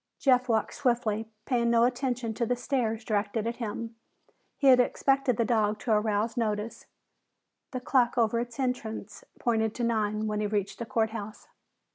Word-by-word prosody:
Jeff 255 -2 +3
walked 220 -2 +1
swiftly, 225 -4 0 0.2
paying 235 -3 +1
no 235 0 +4
attention 245 -2 0
to 235 - -2
the 245 +2 +1
stares 240 -3 -1
directed 210 0 -1
at 235 +1 -2
him. 230 0 -4 0.6
He 280 - -2
had 260 -2 +8
expected 270 -1 +2
the 230 - +2
dog 215 -3 +1
to 235 - -2
arouse 215 +1 +1
notice. 215 -2 -2 0.8
The 255 - -5
clock 250 -1 +2
over 230 0 +2
its 240 +2 -5
entrance 250 - -3
pointed 220 -2 0
to 245 - -3
nine 215 -2 0
when 210 -1 -1
he 210 - 0
reached 200 -1 -2
the 235 - -4
court 220 -1 +1
house. 215 -1 -7
230 Hz, 170 wpm, -28 LUFS, 215-245 Hz, 0.8 s, had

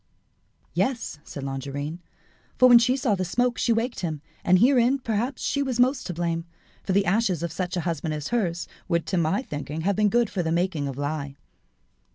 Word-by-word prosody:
"Yes," 235 - -1
said 140 - -8
Longarine; 140 +4 -4 0.6
"for 255 - +7
when 240 -1 +9
she 250 +3 +2
saw 250 -5 +1
the 185 -2 0
smoke 245 +7 0
she 240 - +2
waked 230 +2 0
him, 160 -4 -3 0.2
and 185 - +5
herein, 250 +4 +4
perhaps, 245 +1 -2
was 270 -3 0
she - - -4
most 260 +2 -1
to 180 - -3
blame; 165 -1 -1 0.4
for - - -3
the 200 +1 +3
ashes 190 -3 +1
of 170 - -2
such 180 +2 -3
a - - 0
husband 160 -2 -2
as 150 -1 -4
hers 175 -8 -1 0.2
would 170 -1 0
to 185 - -1
my 170 +8 +1
thinking 150 - -5
have 200 +4 +1
been 210 +1 +3
good 235 0 +2
for 190 - -1
the 160 -1 -1
making 170 -4 0
of 135 -1 -5
lye." 145 -1 -3
185 Hz, 205 wpm, -25 LUFS, 160-235 Hz, 0.6 s, when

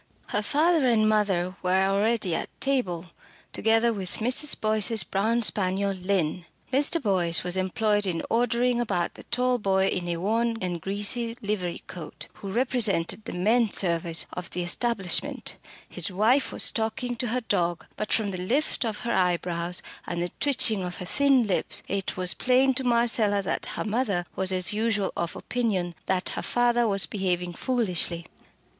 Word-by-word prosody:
Her 210 - 0
father 310 +5 +2
and 220 -3 +3
mother 195 -4 +1
were 185 +1 +2
already 200 -1 +1
at - - -3
table, 185 -11 -1 0.4
together 225 +1 +2
with 190 -4 -4
Mrs. 255 +6 +3
Boyce's 215 -1 +3
brown 225 +5 0
spaniel 195 -1 +1
Lynn. 180 -3 -1 0.3
Mr. 290 +5 +4
Boyce 180 - +1
was 180 0 0
employed 205 +2 +1
in 170 -3 -2
ordering 240 +1 +1
about 185 -7 -1
the - - -13
tall 250 +1 0
boy 195 -2 +2
in 180 -1 -3
a 170 -1 -2
worn 225 +5 0
and 175 -3 -3
greasy 230 +5 -1
livery 195 -4 -3
coat, 170 -4 -6
who 195 - -8
represented 220 -5 0
the - - -5
men 220 +6 +2
service 170 -3 0
of 180 0 -6
the 180 - -3
establishment; 195 +1 0 0.3
his - - -4
wife 225 +9 +2
was - - +2
talking 230 +2 -2
to 245 - -2
her 250 +3 -1
dog, 175 -6 -1
but 215 - -4
from 210 -3 +1
the 185 - -5
lift 265 +10 -1
of 220 -3 -3
her 235 0 -2
eyebrows, 175 -1 -1 0.2
and 170 - -3
the 175 0 -2
twitching 260 -7 +3
of 180 -1 -5
her 180 - -6
thin 275 +2 +3
lips, 195 -4 0
it 195 -1 -3
was 180 -1 +2
plain 260 +1 +3
to 265 +1 -1
Marcella 235 -4 +2
that 190 - -2
her - - -2
mother 210 -5 -1
was 190 0 -1
as 185 +1 +2
usual 210 -2 0
of 170 -1 -3
opinion 200 -8 -2
that 185 -1 0
her - - -4
father 240 -1 +2
was 195 -2 0
behaving 180 -3 -2
foolishly. 180 -8 0
205 Hz, 165 wpm, -26 LUFS, 180-235 Hz, 0.4 s, Mr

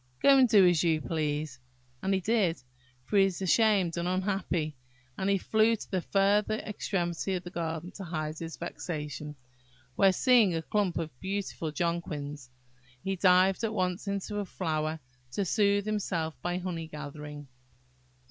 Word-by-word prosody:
Go 280 - +6
and 255 -2 +5
do 200 -4 +7
as 175 -2 +3
you 160 -2 +2
please 150 -3 -2
yourself!" 125 0 -36
And 195 - 0
he - - +1
did; 190 - +1 0.4
for 205 - 0
he 195 - +7
was 190 -3 -2
ashamed 195 -3 +3
and 170 +1 -1
unhappy; 185 -4 -1 0.4
and 190 +1 -1
he 200 - +3
flew 220 +4 +3
to - - -10
the 185 -2 0
further 205 +3 +2
extremity 190 -4 -2
of 180 - -4
the 175 - -8
garden 165 0 -4
to 200 - -8
hide 155 -2 -4
his 165 -1 -6
vexation; 150 -3 -5 0.6
where, 195 -1 +5
seeing 220 -3 +4
a 165 - -2
clump 200 -2 0
of 160 -2 -3
beautiful 190 -4 -3
jonquils, 150 -5 -3 0.5
he 195 0 -1
dived 185 +2 +4
at 220 -1 -1
once 185 +1 -1
into 200 +1 -2
a 205 - -2
flower 160 -3 -2 0.3
to 200 - 0
soothe 200 +1 +2
himself 180 -7 -2
by 175 0 -1
honey 175 -3 -4
gathering. 150 -1 -8
180 Hz, 165 wpm, -29 LUFS, 160-200 Hz, 0.6 s, do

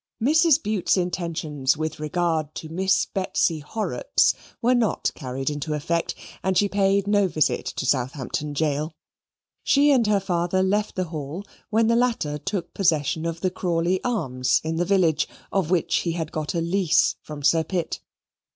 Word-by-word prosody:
Mrs. 310 +5 +4
Bute's 205 -3 +1
intentions 165 -6 -1
with 155 0 -3
regard 155 -1 -1
to 160 - -6
Miss 190 +4 +1
Betsy 185 -4 0
Horrocks 220 - +1 0.3
were 245 +1 +3
not 240 -4 +1
carried 135 0 -4
into 150 +1 -3
effect, 165 +3 -1 0.3
and 190 -1 +1
she 205 - +4
paid 195 0 +2
no 205 -1 +3
visit 155 -4 0
to - - -3
Southampton 135 +3 -1
Gaol. 150 +1 -1 0.7
She 290 +1 +4
and 245 -5 +3
her 210 -1 +3
father 180 0 0
left 205 +2 0
the 185 - 0
Hall 155 +4 -6 0.2
when 225 +1 +3
the 230 +1 +3
latter 230 -12 0
took 180 +4 -4
possession 160 -3 +1
of 165 0 -4
the 185 - 0
Crawley 180 0 0
Arms 130 - +1
in 160 +1 -2
the 175 - +1
village, 170 -6 +2 0.2
of 190 -5 0
which 180 -2 +2
he 170 - -1
had 165 -2 -4
got 155 +2 -3
a 170 - +1
lease 175 0 +2
from 150 -2 -9
Sir 160 +3 +4
Pitt. 175 +1 -3
170 Hz, 165 wpm, -24 LUFS, 155-195 Hz, 0.7 s, Mrs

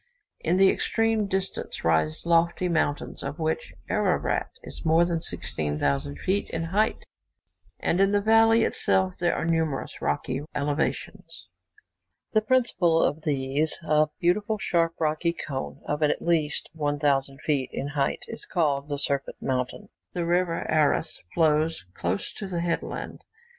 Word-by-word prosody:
In 175 +3 +1
the 195 0 +6
extreme 225 -2 +1
distance 190 0 -3
rise 80 - +1
lofty 170 +1 +3
mountains, 155 -4 -1
of 140 +2 -5
which 160 -1 -2 0.2
Ararat - - +1
is - - -9
more 165 +2 +4
than 170 -2 -1
16,000 70 - -2
feet 195 - 0
in 165 - -2
height, 215 +2 +1 0.7
and 175 - +1
in 195 0 +4
the 205 - +3
valley 225 +2 +5
itself 190 -4 +1
there 175 -1 +2
are - - -2
numerous 160 -4 -1
rocky 125 - -1
elevations. 145 +2 -2 0.8
The 215 - +4
principal 215 -9 +2
of 150 +3 0
these, 140 +1 0
a 155 -1 +3
beautiful 205 +5 +1
sharp 170 -4 +1
rocky 160 +2 +1
cone, 135 -5 -5
of 150 +1 -2
at 150 - +2
least 160 -4 0
1,000 145 -3 0
feet 140 -4 0
in 140 - -3
height, 145 -1 -1
is 230 - -8
called 145 -5 0
the 145 - -1
Serpent 140 -1 -2
Mountain. 125 -1 -2 0.2
The 175 -2 -1
river 175 0 +1
Aras 155 +1 +1
flows 155 - +2
close 90 +3 -2
to 200 - -6
the 175 -2 -2
headland. 170 -1 -3
160 Hz, 140 wpm, -26 LUFS, 145-180 Hz, 0.8 s, the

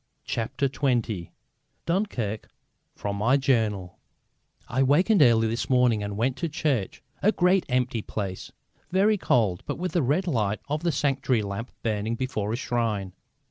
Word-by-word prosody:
CHAPTER 120 +4 -1
XX 120 - -1 0.6
DUNKIRK: 165 - -2 0.5
FROM 100 0 -3
MY 120 +7 +3
JOURNAL 110 -9 0 0.7
I 130 +3 0
wakened 175 +10 +4
early 115 -4 +5
this 115 +2 -2
morning 125 -4 +3
and 100 0 -4
went 125 +4 0
to 170 - -2
church 145 - -1 0.2
a 210 - +4
great 180 -1 +2
empty 125 -2 0
place, 100 -3 -5 0.4
very 200 +4 +3
cold 105 - +2
but - - -3
with 180 +1 -3
the 175 - +1
red 150 +8 +1
light 110 - 0
of 150 +1 -2
the 170 0 +1
sanctuary 135 -5 +1
lamp 100 +4 -5
burning 110 0 -1
before 110 -5 -2
a - - 0
shrine. 115 -6 -2
125 Hz, 150 wpm, -26 LUFS, 105-145 Hz, 0.7 s, early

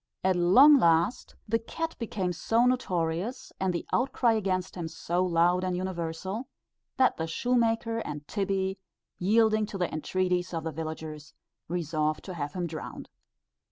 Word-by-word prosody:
At 190 0 +3
long 255 +12 +7
last 170 +7 +2
the 230 +2 +1
cat 325 +8 -4
became 195 -6 -2
so 225 +8 +2
notorious, 190 -2 -1
and 190 -1 +1
the 170 - -3
outcry 245 -2 +2
against 190 -4 -1
him 175 -3 -4
so 170 +2 -1
loud 175 +1 +2
and 180 -1 -1
universal, 185 +5 -4 0.5
that 260 -1 +3
the 160 - -2
shoemaker 230 +3 +1
and 150 -8 -6
Tibbie, 195 -1 -1 0.4
yielding 215 +2 +3
to 205 - -6
the 180 -2 -1
entreaties 180 +2 -1
of 165 - -3
the 160 - -3
villagers, 155 -1 -7 0.3
resolved 155 -2 -1
to 185 - -6
have 145 -3 -4
him 180 -2 -2
drowned. 160 -2 -7
185 Hz, 150 wpm, -28 LUFS, 165-220 Hz, 0.5 s, long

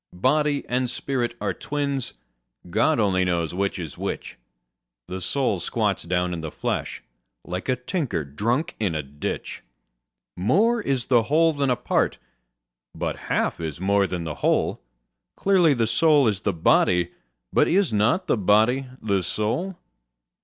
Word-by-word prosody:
Body 150 +1 +2
and 125 0 0
spirit 120 -3 -2
are - - -1
twins: 140 -4 -2 0.6
God 115 - +3
only 95 -3 +2
knows 85 -3 0
which 100 +2 -1
is 80 -6 -7
which: - - -4 0.7
The 95 +1 -5
soul 125 -4 0
squats - - -1
down 90 +1 -1
in 85 - -4
the 80 - -4
flesh, - - -3 0.4
like 90 +5 -5
a 130 - +3
tinker 125 - -2
drunk 120 - -1
in 100 -7 0
a 75 - -2
ditch. 70 +2 -5 0.7
More 210 - +2
is 135 - -1
the 120 -3 +4
whole 165 +2 +4
than 140 -2 0
a 125 - +3
part: 120 - 0 0.8
but - - -2
half - - 0
is 80 -2 -5
more 100 +1 +2
than 90 -2 -3
the 80 -2 -4
whole: - - +1 0.6
Clearly, 180 -7 +4
the 115 -2 +2
soul 145 +4 +4
is 105 -3 0
the 105 - +1
body: 90 +1 +3 0.4
but - - +4
is 185 - +2
not 110 - +2
the - - +1
body 110 +7 +3 0.2
the 100 -3 +1
soul? 115 - -2
115 Hz, 155 wpm, -24 LUFS, 90-140 Hz, 0.8 s, the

